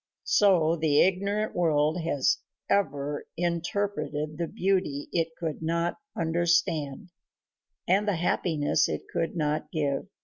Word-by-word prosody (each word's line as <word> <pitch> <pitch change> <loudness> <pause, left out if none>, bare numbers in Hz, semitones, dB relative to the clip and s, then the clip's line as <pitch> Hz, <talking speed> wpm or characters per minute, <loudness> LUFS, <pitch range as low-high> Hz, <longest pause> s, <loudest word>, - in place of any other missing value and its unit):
So 175 -6 +4
the 155 -2 +3
ignorant 200 +3 0
world 155 -1 +2
has 160 +2 +1 0.3
ever 145 -7 0
interpreted 170 -3 -2
the 170 - -1
beauty 185 -8 -1
it 165 -2 +1
could 160 -3 -4
not 170 +1 -1 0.2
understand, 165 -2 0 0.8
and 195 +4 +3
the 205 - +2
happiness 165 -3 +1
it - - -3
could 165 -1 -1
not 150 -1 -1
give. 145 +1 -1
165 Hz, 115 wpm, -27 LUFS, 150-180 Hz, 0.8 s, So